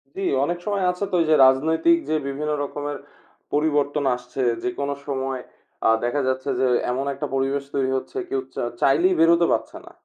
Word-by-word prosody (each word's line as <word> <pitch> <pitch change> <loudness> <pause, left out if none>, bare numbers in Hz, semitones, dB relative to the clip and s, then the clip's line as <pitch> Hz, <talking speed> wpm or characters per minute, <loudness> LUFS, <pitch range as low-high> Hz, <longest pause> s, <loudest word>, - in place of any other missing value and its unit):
জি, 195 - -5 0.2
অনেক 175 +3 -1
সময় 200 -2 -1
আছে 180 +3 -5
তো 180 - +1
ওইযে 155 -1 +3
রাজনৈতিক 160 - +4
যে - - +1
বিভিন্ন 150 +2 -3
রকমের 145 0 -4 0.6
পরিবর্তন 145 -1 +1
আসছে 125 +2 -6 0.2
যেকোন 160 -7 -2 0.2
সময় 135 -2 -3 0.5
আ - - +6
দেখা 140 +4 0
যাচ্ছে 130 +2 -1
যে 130 - +3 0.3
এমন 130 +2 -2
একটা 140 - -4
পরিবেশ 135 +1 0
তৈরি 135 -1 +1
হচ্ছে 400 - -7
কেউ 400 0 -1
চা - - -2 0.2
চাইলেই 170 +7 +4
বেরোতে 170 +1 +5
পারছে - - -3
না। - - -13
145 Hz, 175 wpm, -23 LUFS, 135-170 Hz, 0.6 s, আ